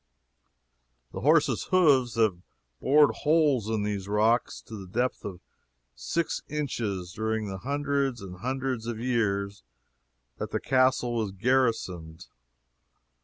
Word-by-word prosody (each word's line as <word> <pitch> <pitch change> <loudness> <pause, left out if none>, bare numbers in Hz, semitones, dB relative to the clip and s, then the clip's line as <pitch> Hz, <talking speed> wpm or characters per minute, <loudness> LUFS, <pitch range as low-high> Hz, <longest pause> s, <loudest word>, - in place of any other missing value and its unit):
The - - -6
horses' - - +3
hoofs 140 -10 +3
have 110 -6 +1 0.4
bored 145 +2 +5
holes 150 -8 +2
in 110 -2 0
these 100 -2 -3
rocks 110 +4 +1
to 110 - -10
the 95 -3 -8
depth 125 +7 -1
of 95 -3 -7 0.5
six 105 - -2
inches 110 -12 -3
during 110 0 -2
the 95 -1 -5
hundreds 140 0 -1
and 90 -3 -9
hundreds 130 0 -3
of 115 -2 -4
years 100 -5 -1 0.8
that - - -3
the - - -2
castle 130 -2 +2
was 110 -4 -1
garrisoned. 95 -7 -1
115 Hz, 120 wpm, -27 LUFS, 100-130 Hz, 0.8 s, bored